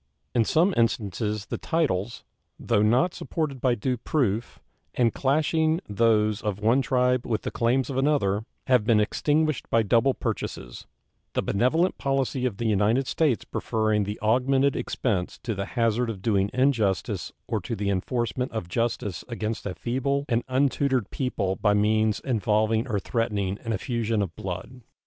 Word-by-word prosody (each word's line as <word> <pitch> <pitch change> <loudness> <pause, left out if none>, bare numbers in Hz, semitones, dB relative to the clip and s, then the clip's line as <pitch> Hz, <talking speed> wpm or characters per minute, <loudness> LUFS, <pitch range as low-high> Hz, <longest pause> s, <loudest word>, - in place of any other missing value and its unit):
In 115 -2 +3
some 175 - +3
instances 105 -2 0
the - - -5
titles, 120 - -1 0.4
though 105 - +1
not 125 +11 +3
supported 145 -6 -3
by 125 -2 +2
due 125 +3 -1
proof, 120 -4 -1 0.4
and 120 -2 +2
clashing 155 +3 +1
those 105 0 +2
of 105 -2 -2
one 115 +5 +3
tribe 125 0 +1
with 110 -2 -1
the - - -3
claims 120 +3 +1
of 135 - -4
another, 135 -8 +1 0.2
have 125 -4 +3
been 110 0 +3
extinguished 150 +7 0
by 115 -1 +3
double 120 +5 +3
purchases, - - -5 0.5
the - - 0
benevolent 150 - +1
policy 135 -2 0
of 105 -6 -5
the 115 - -3
United 110 +5 +2
States 140 -3 +1
preferring 110 -2 0
the 105 +2 -5
augmented 130 +5 +2
expense 95 -8 -2
to 120 -3 -2
the 100 -1 -3
hazard 115 +1 +2
of 95 -4 -6
doing 100 -3 +2
injustice 120 -8 0 0.2
or - - -1
to 115 - -4
the 100 -1 -1
enforcement 120 +6 -2
of 110 -6 -4
justice 105 -1 -2
against 115 -3 -4
a 90 - -4
feeble 140 +3 -1
and 120 -2 +1
untutored 130 -3 +1
people 100 -8 -1
by 105 -1 +2
means 110 +1 +2
involving 110 0 +1
or 105 -5 0
threatening 100 -2 -1
an 115 - -3
effusion 115 0 -1
of 90 -3 -6
blood. 95 +7 -6
115 Hz, 160 wpm, -26 LUFS, 105-130 Hz, 0.5 s, In